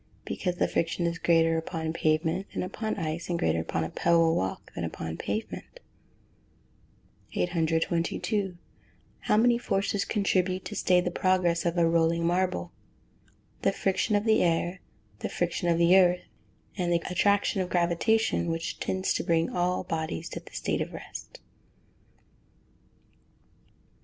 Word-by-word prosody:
_ - - -37
Because 180 -2 -2
the - - +1
friction 170 +1 -1
is 170 0 -1
greater 165 -1 +3
upon 160 -1 -4
pavement 160 +4 0
than - - -3
upon 215 +4 -3
ice, 165 0 -3
and 175 - 0
greater 80 - +1
upon 80 0 -2
a 80 - -3
pebble 165 -1 +3
walk 95 0 -3
than - - -4
upon 80 0 -4
pavement. 220 - -5 1.6
822. 175 +3 0 0.6
How 210 - +1
many 235 +1 +4
forces 200 -2 0
contribute 185 -3 0
to 210 - -6
stay 180 -3 +3
the 180 - -2
progress 175 -2 +1
of 170 +1 -1
a 170 -1 +4
rolling 165 0 +2
marble? 175 - 0 0.9
The - - +3
friction 195 +2 0
of 205 +1 +1
the 220 -1 +4
air, 175 +2 +1 0.4
the - - -3
friction 175 0 -1
of 170 - +3
the 170 +2 +5
earth, 180 -1 +4 0.5
and 175 -3 -1
the 170 -1 +1
attraction 200 +2 +2
of 180 - -3
gravitation, 175 +5 +1
which 165 0 -3
tends 190 0 0
to - - -1
bring 165 -1 +1
all 180 +1 0
bodies 160 - -3
to - - -6
a - - -15
state - - -2
of - - -4
rest. - - -9
175 Hz, 145 wpm, -28 LUFS, 165-185 Hz, 1.6 s, the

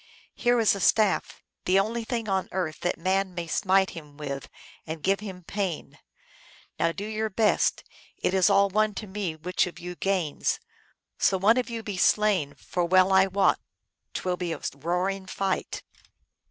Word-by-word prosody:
Here 240 -1 +2
is 220 -3 +4
a 200 - -4
staff, 210 +2 +2 0.2
the 190 +2 +4
only 230 +4 -1
thing 230 -1 -3
on 190 -1 0
earth 180 -4 -2
that 175 - -1
man 190 +1 0
may 170 -1 -3
smite 190 +3 +2
him 150 -4 -11
with 140 -2 -5 0.4
and 160 -1 -6
give 195 +1 +2
him 190 -3 -8
pain. 190 -3 -4 0.8
Now, 165 - +2
do 200 +4 -6
your 220 0 -2
best; 215 +1 +2 0.3
it - - 0
is 190 +1 +4
all 200 0 +5
one 215 +1 +1
to 215 - -5
me 190 -4 -4
which 180 +4 0
of 175 - -9
you 175 +1 -6
gains, 180 -5 -1 0.6
so 190 - +3
one 210 +6 +4
of 250 - 0
you 230 -1 -5
be 205 -3 -4
slain, 190 -7 +2
for 175 - -3
well 185 +2 +4
I 190 0 +6
wot 195 0 +2 0.6
t - - -2
will 180 -1 0
be 175 -2 -2
a - - -8
roaring 180 +5 -2
fight." 195 0 -2
190 Hz, 180 wpm, -27 LUFS, 175-205 Hz, 0.8 s, I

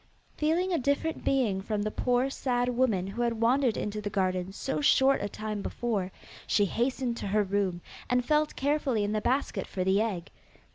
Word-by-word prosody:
Feeling 340 +5 +1
a 335 - +2
different 285 +4 -1
being 225 -8 +1
from 210 +1 -2
the 215 - -2
poor 250 +4 +1
sad 245 -2 0
woman 240 -7 +1
who 200 +5 -4
had 235 -2 0
wandered 245 +1 +3
into 210 0 -3
the 205 - -3
garden 185 -2 -1
so 270 +8 -3
short 275 -1 +4
a 205 - -2
time 215 0 -4
before, 200 -5 -2 0.4
she 205 - +3
hastened 240 +3 -1
to - - -4
her 210 +2 +2
room, 195 -3 -1 0.3
and 250 0 +2
felt 300 +1 +2
carefully 275 -5 +1
in 205 - -1
the 215 0 0
basket 265 +6 -1
for 185 - -2
the 190 +2 +3
egg. 195 -7 -3
230 Hz, 190 wpm, -29 LUFS, 205-265 Hz, 0.4 s, short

